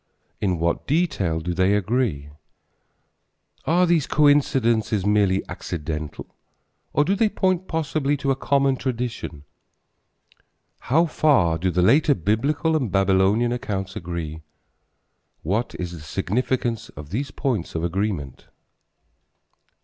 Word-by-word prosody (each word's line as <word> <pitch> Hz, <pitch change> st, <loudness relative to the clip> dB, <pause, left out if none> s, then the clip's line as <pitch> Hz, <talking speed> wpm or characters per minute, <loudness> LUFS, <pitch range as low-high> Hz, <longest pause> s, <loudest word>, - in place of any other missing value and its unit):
In 95 Hz, -4 st, 0 dB
what 85 Hz, +1 st, -1 dB
details 100 Hz, -, 0 dB
do 90 Hz, +1 st, -2 dB
they 95 Hz, +3 st, +3 dB
agree? 105 Hz, -, -1 dB, 1.4 s
Are 175 Hz, +3 st, +3 dB
these 170 Hz, -4 st, +2 dB
coincidences 120 Hz, -8 st, +2 dB
merely 100 Hz, -2 st, +2 dB
accidental 75 Hz, -2 st, -6 dB, 0.6 s
or 145 Hz, -, +2 dB
do 195 Hz, -, +2 dB
they 215 Hz, +1 st, +2 dB
point 185 Hz, -2 st, 0 dB
possibly 150 Hz, -2 st, -1 dB
to 135 Hz, 0 st, 0 dB
a -, -, +2 dB
common 135 Hz, 0 st, +1 dB
tradition? 120 Hz, -, -4 dB, 1.4 s
How 160 Hz, +8 st, +2 dB
far 130 Hz, -, +2 dB
do 95 Hz, +3 st, 0 dB
the 90 Hz, 0 st, +1 dB
later 145 Hz, -, +4 dB
Biblical 145 Hz, -, 0 dB
and 130 Hz, -10 st, -1 dB
Babylonian 95 Hz, +4 st, +3 dB
accounts 100 Hz, -6 st, -3 dB
agree? 85 Hz, -2 st, -5 dB, 1.0 s
What 105 Hz, +9 st, -1 dB
is 90 Hz, -1 st, -4 dB
the 85 Hz, -, -8 dB
significance 115 Hz, -, -2 dB
of 75 Hz, 0 st, -11 dB
these 135 Hz, +7 st, -2 dB
points 105 Hz, -, -2 dB
of 80 Hz, -, -2 dB
agreement? 85 Hz, -, -3 dB
110 Hz, 120 wpm, -23 LUFS, 90-140 Hz, 1.4 s, later